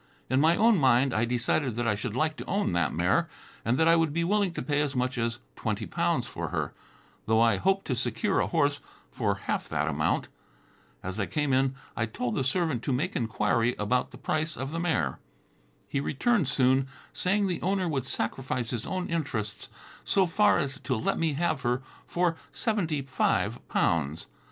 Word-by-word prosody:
In 130 +1 +4
my 160 +2 +5
own 225 -3 +5
mind, 130 -1 +4
I 110 +2 +2
decided 120 +1 0
that 120 0 -1
I 105 - +3
should 105 +1 -4
like 155 +4 +1
to - - -6
own 200 - 0
that 85 -5 +1
mare, - - +1 0.3
and 120 +4 +1
that 160 - +4
I 165 - +7
would 165 -2 +2
be 170 +3 0
willing 200 +1 +2
to - - -4
pay 145 -1 +1
as 145 -2 -1
much 125 0 0
as 115 0 -1 0.2
twenty - - -2
pounds - - 0
for - - -5
her, - - -2 0.5
though 110 0 +4
I 115 0 +4
hoped 195 +1 +1
to 130 - -1
secure 115 - 0
a - - +1
horse - - +1 0.3
for - - 0
half - - -2
that 75 0 0
amount. 75 -1 0 0.8
As 95 +3 -4
I 100 - 0
came 145 -3 0
in 135 0 +2 0.2
I 115 - 0
told 120 +2 -3
the 135 - 0
servant 150 -2 0
to - - 0
make 130 +4 -1
inquiry 115 +1 +1
about 125 +5 0
the - - -12
price 155 0 -2
of 135 +2 -4
the 165 - -3
mare. 155 - 0 0.7
He 140 - -1
returned 170 - +1
soon, 130 0 +3 0.3
saying 200 +3 +1
the 180 -3 -2
owner 190 0 +1
would 135 -5 -2
sacrifice 125 0 -2
his 120 -2 -3
own 185 -1 -2
interests 110 -12 -3 0.3
so 195 -1 +3
far 205 +4 +4
as 140 -4 -2
to 135 -1 -1
let 110 - -1
me 160 -2 +1
have 155 -2 0
her 125 +2 0 0.2
for 175 -1 +1 0.2
seventy 170 - -1
five 130 -1 0
pounds. 80 -1 0
135 Hz, 195 wpm, -28 LUFS, 115-165 Hz, 0.8 s, I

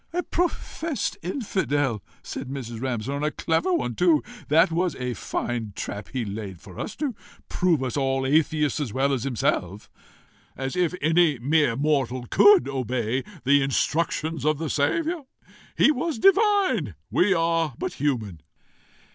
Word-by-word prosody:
"A 355 +1 0
professed 330 -3 -2
infidel!" 145 - -1 0.2
said 135 - -6
Mrs. 120 -4 -6
Ramshorn. 130 +3 -2
"A 150 - +2
clever 165 +4 0
one 125 -9 0
too! 165 +2 +3 0.2
That 165 +2 +4
was 175 -1 0
a 125 -1 -3
fine 115 -3 -3
trap 100 0 -5
he 125 -4 -2
laid 100 -3 -6
for 95 0 -12
us, - - -5
to 290 -4 -2 0.4
prove 170 -7 +1
us 125 - -3
all 135 -1 0
atheists 150 0 +2
as 140 -7 -3
well 135 +4 +1
as 130 -1 -2
himself! 105 -6 -1 0.7
As 135 0 -3
if 180 -1 +1
any 160 -2 +4
mere 145 0 +2
mortal 135 -3 0
COULD 205 -9 +6
obey 130 -2 -1 0.2
the 140 +2 +4
instructions 155 +2 0
of 155 0 +2
the 160 -1 -3
Saviour! 310 - 0 0.5
He - - +6
was 310 0 -2
divine; 390 - +3 0.2
we 190 +1 +3
are 165 -4 +1
but - - -3
human!" 115 - -2
145 Hz, 145 wpm, -25 LUFS, 125-170 Hz, 0.7 s, COULD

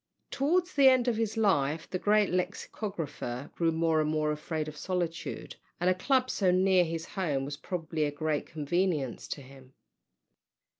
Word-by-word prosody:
Towards 345 +6 +1
the 275 -1 +6
end 255 -1 +3
of 240 - +2
his 225 0 -1
life 160 -8 +2
the 185 - -3
great 210 0 +3
lexicographer 175 - -4
grew 165 -1 +1
more 160 -1 +2
and 155 - 0
more 155 -1 +1
afraid 155 +1 -3
of 155 - -7
solitude, 175 -1 -4 0.2
and 180 +1 +3
a - - +4
club 255 +7 +1
so 190 -3 +2
near 185 0 +4
his 165 -1 -4
home 150 -9 -2
was 145 +1 -4
probably 160 -2 -2
a 145 - -1
great 150 0 -2
convenience 155 -3 -1
to 140 - -5
him. 130 0 -16
165 Hz, 165 wpm, -30 LUFS, 150-195 Hz, 0.2 s, the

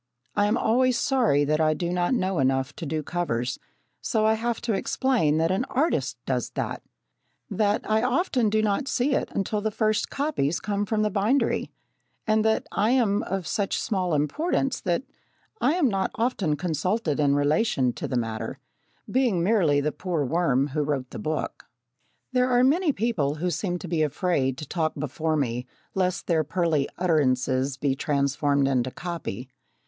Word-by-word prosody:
I 205 0 +3
am 215 +3 +2
always 250 +2 +2
sorry 230 - +2
that 155 +2 +1
I 155 0 +3
do 175 +2 -2
not 180 +7 +1
know 185 -6 0
enough 135 +1 +1
to 165 - -5
do 155 +1 -2
covers, 125 -8 -2 0.4
so 215 - +1
I 220 - +4
have 230 +1 -1
to 230 - -1
explain 205 - +1
that 165 +2 +2
an 190 +6 +1
artist 150 - 0
does 125 -3 -1
that - - -3 0.7
that 210 -1 +1
I 215 0 +2
often 255 - +1
do 215 +1 +1
not 215 +6 0
see 270 +1 +1
it - - 0
until 205 +2 -1
the 220 - 0
first 215 0 0
copies 275 - -1
come 205 0 -2
from 215 0 +1
the 210 - +1
bindery, 215 +9 +1 0.6
and 215 0 +2
that 220 0 +1
I 210 +2 +1
am 230 -5 +2
of 190 -1 -3
such 200 +3 -1
small 185 -6 0
importance 270 - 0
that 180 +6 0 0.6
I 275 - +3
am 345 -6 +3
not 195 -4 0
often 225 - 0
consulted 170 +1 -1
in 140 -1 +3
relation 145 - +2
to - - -5
the 125 - -1
matter 115 -2 -3 0.5
being 240 -10 +1
merely 170 -8 +3
the 150 +1 0
poor 170 -5 -2
worm 140 -3 +1
who 150 +2 -1
wrote 140 -3 -2
the - - -6
book. 155 0 -3 0.7
There 250 0 +2
are 245 0 +4
many 310 +5 +3
people 195 - 0
who 175 +3 -1
seem 175 +2 -2
to 180 - -8
be 165 -2 0
afraid 145 -4 0
to 150 - -7
talk 160 0 -1
before 155 +3 -1
me 125 -3 -2 0.3
lest 185 -2 0
their 160 -2 +2
pearly 155 -3 0
utterances 135 -5 +1
be 140 -1 +1
transformed 140 0 +1
into 130 -2 +1
copy. 135 - -5
175 Hz, 175 wpm, -25 LUFS, 145-220 Hz, 0.7 s, I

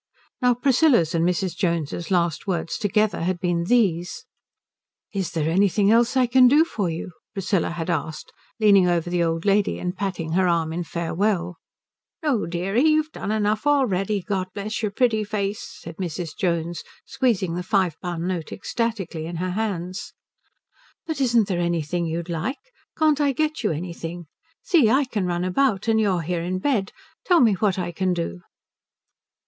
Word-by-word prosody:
Now 250 -1 +4
Priscilla's 245 - +3
and 165 -1 +1
Mrs. 180 +1 0
Jones's 170 -1 -2
last 175 -3 0
words 175 -3 -2
together 210 -1 +1
had 175 +1 -1
been 175 -2 0
these: 180 -6 +1 0.9
"Is 195 -3 -2
there 160 -2 -1
anything 200 +4 +3
else 235 +3 +3
I 255 - +5
can 250 +1 +6
do 295 +6 +5
for 205 - -2
you?" 165 +2 -5 0.2
Priscilla 195 -2 0
had 170 -1 -4
asked, 160 -1 -4 0.3
leaning 200 -4 +5
over 175 0 0
the 175 -1 +1
old 165 +1 -1
lady 205 0 +2
and 180 +1 -3
patting 185 -5 -3
her 185 +2 +2
arm 165 -2 +1
in 175 +1 -3
farewell. 175 +1 -1 0.7
"No, 270 - +1
deary 185 +8 0
you've 310 0 +3
done 210 - -4
enough 215 +4 0
already, 210 -8 +1
God 190 -1 -2
bless 210 +2 -3
your 215 - 0
pretty 220 0 +1
face," 205 +1 -2 0.2
said 165 0 -9
Mrs. 175 -3 -4
Jones, 170 -2 -1 0.2
squeezing 210 -10 0
the 175 - -2
five 190 -4 +1
pound 175 -1 -3
note 175 -4 -3
ecstatically 195 -8 -3
in 170 - -6
her 180 +2 -2
hands. 190 -1 -4 0.9
"But 315 -4 -3
isn't 235 -5 +3
there 175 -3 -1
anything 170 0 -1
you'd 165 +1 -3
like? 175 - -3 0.4
Can't 305 -2 +3
I 285 -1 +2
get 310 +3 -1
you - - +2
anything? 170 +1 -5 0.4
See, 305 -11 +4
I 270 +4 +3
can 210 -7 -2
run 175 0 -1
about 200 +2 +1
and 220 -1 +3
you 210 - +2
are 180 -2 0
here 170 +1 -2
in 180 +2 -2
bed. 200 -2 0 0.3
Tell 355 -2 +4
me 230 -3 +5
what 195 0 0
I 175 -2 -2
can 185 +1 0
do." 90 - -4
185 Hz, 175 wpm, -23 LUFS, 170-220 Hz, 0.9 s, can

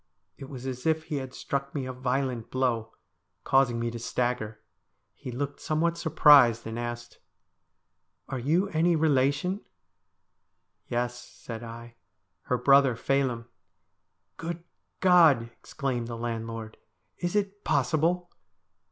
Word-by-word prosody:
It 135 - -10
was 130 -2 -8
as 130 +1 -4
if 160 0 +2
he 155 -2 -3
had 130 -2 -5
struck 140 +1 -3
me 135 -3 -2
a 130 - -5
violent 125 -2 -2
blow, 120 -4 0 0.5
causing 135 -3 +3
me 115 0 -1
to 120 - -6
stagger. 120 -2 -2 0.5
He - - -9
looked 140 +3 -4
somewhat 165 +2 0
surprised, 145 -8 +6
and 115 +1 -4
asked: 120 0 -6 0.5
' - - -51
Are 130 - -4
you 165 +10 +2
any 170 +1 +2
relation? 150 +5 +1 0.4
' - - -51
' - - -51 0.3
Yes,' 120 0 -2
said 115 -2 -8
I, 115 0 -10 0.2
' 95 -1 -51
her 125 - +2
brother 135 0 +5
Phelim.' 125 -1 0 0.5
' - - -51
Good 170 +1 -5 0.4
God! 170 -9 +6 0.2
exclaimed 130 -5 -3
the 115 -1 -5
landlord, 115 -1 -5 0.2
' - - -48
is 175 +2 -1
it 205 0 -1
possible 165 +6 +1
130 Hz, 145 wpm, -28 LUFS, 120-155 Hz, 0.5 s, surprised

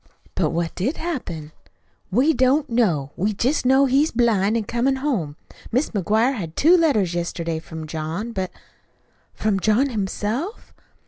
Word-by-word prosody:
"But - - +1
what 170 0 -2
did 245 - -2
happen?" 185 - -5 0.6
"We 260 +11 +3
don't 275 +3 +2
know. 170 - +1
We 205 +4 0
just 250 +6 0
know 265 +2 +5
he's 275 +4 +3
blind 225 -3 +2
an' 225 - -1
comin' 240 +5 0
home. 240 - -2 0.4
Mis' 260 +6 +1
McGuire 220 +5 +2
had 170 -10 -6
two 330 +5 +5
letters 265 - +2
yesterday 170 -1 -2
from 160 -1 -8
John, 160 +8 -4
but 190 -4 -3 0.5
" - - -40
"From 210 -2 0
John 220 +8 +2
himself?" 225 - -3
220 Hz, 150 wpm, -22 LUFS, 175-265 Hz, 0.6 s, know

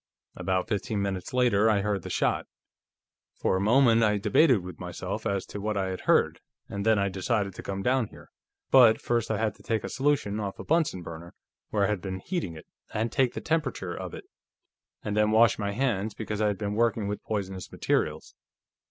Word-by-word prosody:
"About 95 0 -1
fifteen 105 -1 -2
minutes 95 -2 -3
later 120 -4 +3
I 105 -2 +3
heard 100 -1 -1
the - - -7
shot. - - 0 0.9
For - - 0
a 95 - 0
moment, 115 +2 +5
I 105 -2 +3
debated 105 - +4
with 90 -3 -9
myself - - -4
as 100 -1 -1
to 105 - -7
what 105 0 -1
I 95 -1 0
had 95 - -5
heard, - - +3 0.3
and 100 0 -4
then 110 0 +4
I 100 0 +2
decided 100 +1 -1
to - - -8
come 95 0 -4
down 130 -1 +2
here. - - -16 0.4
But 120 -4 +7
first 120 -2 -1
I 110 - 0
had 110 0 0
to - - -17
take 110 -1 -1
a - - -4
solution 135 -7 0
off 100 -2 -4
a - - -7
Bunsen 155 - +1
burner, 85 +1 -9 0.3
where 105 -2 +1
I - - +3
had 105 -4 -1
been 95 0 -4
heating 95 - -3
it, 80 - -11 0.3
and 110 +2 -1
take 130 -2 +1
the - - -4
temperature 155 - -1
of - - -6
it, - - -9 0.8
and 105 - -2
then 105 0 +3
wash 110 +1 +4
my 100 -1 -1
hands, 110 -3 -1
because 105 -1 -4
I 105 - +3
had 105 -2 -1
been 105 0 -3
working 115 -1 +1
with 105 0 -3
poisonous 95 -4 -4
materials. - - -1
105 Hz, 210 wpm, -27 LUFS, 100-115 Hz, 0.9 s, But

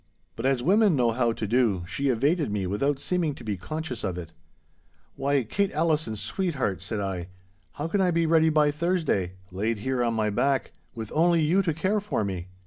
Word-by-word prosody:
But 115 - -1
as 135 -3 +1
women 200 - +4
know 120 -3 +3
how 120 0 +1
to 110 - -4
do, 110 -5 +2
she 140 +8 -2
evaded 145 +6 +1
me 100 -2 -1
without 135 +10 0
seeming 160 0 -1
to - - -11
be 105 -2 -2
conscious 155 - -5
of 95 -3 -2
it. 85 -2 -8 0.8
'Why, 140 -1 +1
Kate 195 - 0
Allison, 155 -7 +1
sweetheart!' 135 - -2
said 110 - -4
I, 95 -3 -3 0.5
'how 150 - -3
can 195 +4 +1
I 185 - +3
be 170 -1 +2
ready 160 0 +4
by 150 -1 +3
Thursday, 150 - 0 0.2
laid 105 +5 -1
here 125 +3 -1
on 115 -1 0
my 110 -1 +1
back, 135 +6 +1 0.2
with 110 -2 -6
only 170 0 +3
you 175 +6 +3
to 170 -4 0
care 190 +6 +1
for 200 - -2
me? 95 -2 -4
135 Hz, 200 wpm, -26 LUFS, 105-165 Hz, 0.8 s, women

